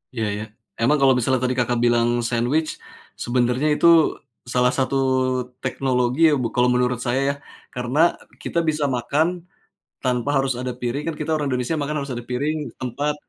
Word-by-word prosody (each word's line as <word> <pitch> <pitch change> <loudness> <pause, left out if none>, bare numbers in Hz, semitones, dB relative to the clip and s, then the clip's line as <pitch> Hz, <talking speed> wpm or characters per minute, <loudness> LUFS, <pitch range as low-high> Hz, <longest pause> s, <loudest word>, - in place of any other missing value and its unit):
Iya 110 -2 -1
iya, 105 - -4 0.4
emang 140 +6 +4
kalau 135 -1 +5
misalnya 130 +1 +1
tadi 125 0 0
Kakak 120 0 +1
bilang 120 0 +3 0.2
sandwich, 125 +7 0 0.5
sebenarnya 125 +3 +1
itu 170 - +3 0.7
salah 125 0 +3
satu 135 0 0 0.7
teknologi 130 0 0
ya, 155 - +3
bu - - +1
kalau 125 0 +3
menurut 125 -1 +1
saya 120 +2 +1
ya. - - +1 0.4
Karena, 125 +3 -2 0.4
kita 170 - -1
bisa 150 -1 -1
makan 140 +7 +1 0.8
tanpa 125 +1 0
harus 135 0 +2
ada 125 0 -3
piring 125 +4 -2
kan 165 - -2
kita 150 - -3
orang 150 -2 -1
Indonesia, 130 +4 -1
makan 145 +1 -2
harus 140 - -6
ada 120 0 -6
piring, 145 +5 -1 0.2
tempat. 140 +4 -2
125 Hz, 165 wpm, -22 LUFS, 120-145 Hz, 0.8 s, kalau